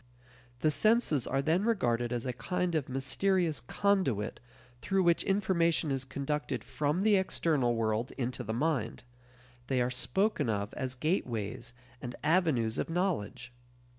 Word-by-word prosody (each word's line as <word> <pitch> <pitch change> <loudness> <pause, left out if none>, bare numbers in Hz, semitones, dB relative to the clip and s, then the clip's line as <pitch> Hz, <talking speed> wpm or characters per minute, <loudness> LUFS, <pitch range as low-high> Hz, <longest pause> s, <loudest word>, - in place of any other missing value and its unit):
The 155 - +3
senses 215 - +2
are 135 +1 0
then 165 +6 +2
regarded 120 - +1
as 120 0 -2
a 125 - -2
kind 180 +9 -2
of 155 -5 -1
mysterious 155 +4 +1
conduit 135 - 0 0.4
through 195 0 +1
which 170 -1 +3
information 170 -6 +1
is 135 -1 -2
conducted 140 -3 -3
from 150 +4 -1
the 210 -1 +4
external 150 -9 +1
world 115 +2 0
into 125 -1 -3
the 110 - -4
mind; 120 -4 -1 0.6
they 130 -1 +1
are 125 0 +1
spoken 190 - 0
of 100 -1 -2
as 130 -1 -3
gateways 125 - -2 0.3
and 125 -1 -6
avenues 150 -9 +2
of - - -2
knowledge. 130 - -2
140 Hz, 140 wpm, -31 LUFS, 120-180 Hz, 0.6 s, the